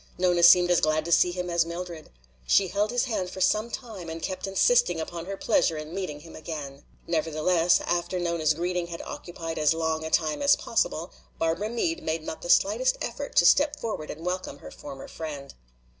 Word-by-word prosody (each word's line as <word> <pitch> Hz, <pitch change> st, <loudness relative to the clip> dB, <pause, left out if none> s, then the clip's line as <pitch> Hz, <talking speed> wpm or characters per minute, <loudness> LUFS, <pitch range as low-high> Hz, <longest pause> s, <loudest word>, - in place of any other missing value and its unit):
Nona 180 Hz, -1 st, +2 dB
seemed 175 Hz, +1 st, +7 dB
as 175 Hz, -, +4 dB
glad 155 Hz, 0 st, +1 dB
to 170 Hz, -, -4 dB
see 180 Hz, -, +5 dB
him 180 Hz, 0 st, -4 dB
as 170 Hz, -1 st, +3 dB
Mildred. 170 Hz, -1 st, -7 dB, 0.4 s
She 190 Hz, -2 st, +4 dB
held 205 Hz, +3 st, 0 dB
his 245 Hz, +1 st, +1 dB
hand 215 Hz, -8 st, -2 dB
for 190 Hz, -, -8 dB
some 215 Hz, +5 st, +2 dB
time 220 Hz, -9 st, -7 dB
and 165 Hz, 0 st, -5 dB
kept 185 Hz, +3 st, -4 dB
insisting 195 Hz, -2 st, +3 dB
upon 170 Hz, +1 st, -6 dB
her 195 Hz, 0 st, -5 dB
pleasure 160 Hz, -, +1 dB
in 155 Hz, +1 st, -7 dB
meeting 180 Hz, -6 st, -4 dB
him 165 Hz, +1 st, -13 dB
again. 145 Hz, -4 st, -7 dB, 0.2 s
Nevertheless, 165 Hz, +2 st, +2 dB
after 175 Hz, +1 st, -1 dB
Nona's 170 Hz, -3 st, +1 dB
greeting 175 Hz, +1 st, -2 dB
had 170 Hz, -1 st, -7 dB
occupied 165 Hz, -2 st, -6 dB
as 155 Hz, +1 st, +3 dB
long 160 Hz, -1 st, -1 dB
a 160 Hz, -, -4 dB
time 155 Hz, -, +1 dB
as 285 Hz, 0 st, +5 dB
possible, -, -, -1 dB, 0.2 s
Barbara 165 Hz, +6 st, -1 dB
Meade 225 Hz, -8 st, -1 dB
made 160 Hz, 0 st, -2 dB
not 160 Hz, -, -6 dB
the 175 Hz, -, -7 dB
slightest -, -, +3 dB
effort -, -, -5 dB
to -, -, +5 dB
step 290 Hz, +1 st, +4 dB
forward 210 Hz, -9 st, -4 dB
and 160 Hz, +3 st, -7 dB
welcome 180 Hz, -5 st, -3 dB
her -, -, -11 dB
former 135 Hz, -2 st, -9 dB
friend. 145 Hz, -4 st, -7 dB
170 Hz, 200 wpm, -26 LUFS, 160-190 Hz, 0.4 s, seemed